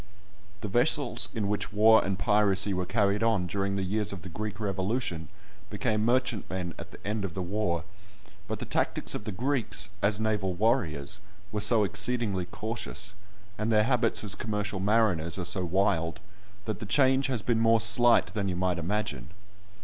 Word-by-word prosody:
The 110 - -3
vessels 125 +5 +2
in 105 -3 -1
which 105 0 -2
war 110 +2 +6
and 95 -1 -2
piracy 100 0 +2
were 90 -1 -2
carried 100 0 +1
on 115 -5 +2
during 100 +2 -2
the 100 - -1
years 105 +2 -1
of 95 -5 -8
the 95 - -7
Greek 105 +4 -5
Revolution 100 - -2 0.4
became 110 0 -1
merchantmen 110 -7 -1
at - - -8
the - - -12
end 105 0 -1
of 95 -4 -4
the 95 - -2
war; 90 -3 -1 0.6
but - - -3
the - - -6
tactics - - -1
of 105 - -5
the 110 - -3
Greeks, 110 -4 -1
as 100 +1 +2
naval 105 -4 0
warriors, 100 - 0 0.3
were 105 - -2
so 110 +1 +5
exceedingly 100 -1 0
cautious, 105 0 -3 0.5
and 110 +1 0
their 105 -1 +4
habits 120 -2 +1
as 100 -2 0
commercial 105 -1 -3
mariners 95 -5 +2
are 90 - -3
so 90 +1 0
wild, 85 -2 0 0.5
that 110 - -3
the 105 - -6
change 135 +2 +3
has 125 -6 -2
been 115 -2 +1
more 115 0 +4
slight 115 +2 +3
than 100 -3 -1
you 90 - -2
might 90 -1 0
imagine. 85 - -3
105 Hz, 175 wpm, -28 LUFS, 95-110 Hz, 0.6 s, war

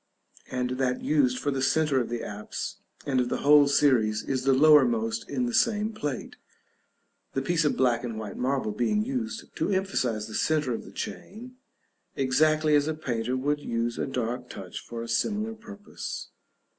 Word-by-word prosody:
and 125 0 -2
that 125 -1 0
used 130 -5 +2
for 145 - -1
the 135 -1 -2
centre 145 0 +2
of 120 - -4
the 120 -1 -3
apse, 105 +1 -5 0.3
and 135 -3 +1
of 125 - -2
the - - -2
whole 145 0 +7
series, 125 -7 +3
is 130 -1 -2
the 135 - +5
lowermost 225 - +4
in 250 - -1
the 240 - -3
same 220 -1 +2
plate; 145 - -5 1.0
the 135 - 0
piece 165 +2 +1
of 150 - +1
black 125 -2 +2
and 115 -3 -4
white 110 -2 -6
marble 130 -3 -1
being 165 - 0
used 235 -3 -4
to - - -1
emphasize 160 - 0
the 110 - -9
centre 150 0 +1
of - - -5
the - - -11
chain, 245 +5 -7 0.6
exactly 155 +4 +2
as 145 0 +3
a 155 - -1
painter 125 -4 -2
would 145 +3 0
use 115 -3 -2
a - - -1
dark 125 -1 -3
touch 90 -2 -7
for 115 -1 -6
a - - -7
similar 210 - 0
purpose. 210 -2 -8
140 Hz, 180 wpm, -27 LUFS, 125-190 Hz, 1.0 s, whole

